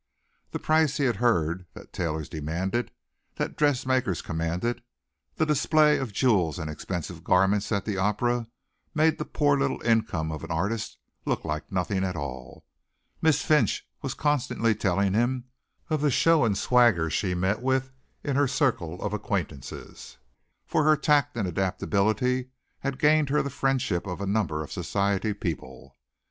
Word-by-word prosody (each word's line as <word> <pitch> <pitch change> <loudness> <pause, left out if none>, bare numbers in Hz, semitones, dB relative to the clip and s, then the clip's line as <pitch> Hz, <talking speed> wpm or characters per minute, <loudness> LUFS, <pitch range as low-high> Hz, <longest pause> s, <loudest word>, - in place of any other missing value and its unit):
The - - -3
prices 155 -2 +2
he 140 - +1
heard 95 -8 +1
that - - -13
tailors 80 -3 -2
demanded 90 +9 -2 0.5
that - - -3
dressmakers 130 - +1
commanded, 85 +8 -2 0.5
the 160 - +1
display 150 0 +3
of 130 -5 -3
jewels 95 - +2
and 80 0 -4
expensive 85 +2 -5
garments 95 +3 +2
at 100 -3 0
the 105 -3 -2
opera, 115 +4 0 0.5
made 155 +1 +3
the - - -2
poor 145 -1 +2
little - - 0
income 110 -9 +1
of 80 - -6
an - - -7
artist 100 +7 -2 0.3
look - - -2
like 75 -1 -4
nothing 95 +1 0
at 90 -1 -2
all. 65 -5 -7 0.6
Miss 160 -3 +3
Finch 150 -9 +2
was - - -3
constantly 125 -6 +1
telling 100 -1 +1
him 120 +3 +1 0.4
of 155 -2 0
the 150 - +3
show 160 +1 +4
and 100 -4 +1
swagger 115 -11 +3
she 90 +2 0
met 95 +5 0
with 130 0 0 0.3
in 140 -3 -1
her 145 0 +3
circle 105 - 0
of - - -2
acquaintances, 95 - -5 0.5
for 155 - +1
her 155 0 +5
tact 145 -5 +2
and 105 -5 0
adaptability 105 - 0 0.3
had 135 -1 -3
gained 150 0 +3
her 150 +2 +2
the 140 - -4
friendship 130 -9 0
of 90 -1 -4
a 100 - -3
number 95 -7 0
of 75 - -11
society 100 +1 0
people. 80 -10 -6
105 Hz, 155 wpm, -27 LUFS, 90-135 Hz, 0.6 s, her